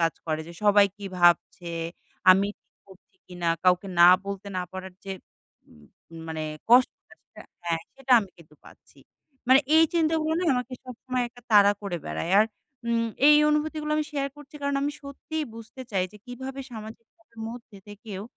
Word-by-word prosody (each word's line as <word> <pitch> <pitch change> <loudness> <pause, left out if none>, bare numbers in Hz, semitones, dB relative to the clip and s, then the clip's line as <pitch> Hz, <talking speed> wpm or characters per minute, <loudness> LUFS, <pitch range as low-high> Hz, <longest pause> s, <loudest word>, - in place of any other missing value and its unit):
কাজ 165 -1 +2
করে 155 0 -1
যে, - - -9
সবাই 205 0 +6
কী 205 - -10
ভাবছে, 175 0 +2 0.6
আমি 195 +2 +5
ঠিক - - -55
করছি 190 - -20
কিনা, 175 -2 -3 0.2
কাউকে 180 +2 +3
না 175 - +10 0.2
বলতে 200 0 -6
না 180 - -1
পারার 190 0 -8
যে, 195 - -4 0.6
উম 75 -1 -19 0.4
মানে 160 -1 -4 0.3
কষ্টটা, 250 +1 +3
সেটা - - -16 0.2
হ্যাঁ, 165 -1 -1
সেটা 270 -1 -1
আমি 200 - -8
কিন্তু 155 -2 -18
পাচ্ছি। - - -19 0.5
মানে 265 +2 +7 0.2
এই 325 - +7
চিন্তাগুলা 320 -1 +1
না - - -1
আমাকে 250 +1 -3
সবসময় 255 0 -4
একটা 245 +1 -18
তাড়া 205 -1 +7
করে 185 -3 -3
বেড়ায়। 80 - -4
আর 215 - +6 0.4
উম 230 0 +1 0.2
এই 300 - +8
অনুভূতিগুলা 300 0 -1
আমি 305 - 0
শেয়ার 275 -1 -1
করছি 295 0 -15
কারণ 280 0 0
আমি 290 +1 -1
সত্যিই 300 +3 -5
বুঝতে 230 +3 -11
চাই 185 -2 +1
যে, - - -13
কীভাবে 265 +2 -7
সামাজিকতার 230 +5 -12
মধ্যে 230 -3 -10
থেকেও 205 -2 -8
225 Hz, 170 wpm, -26 LUFS, 185-275 Hz, 0.6 s, না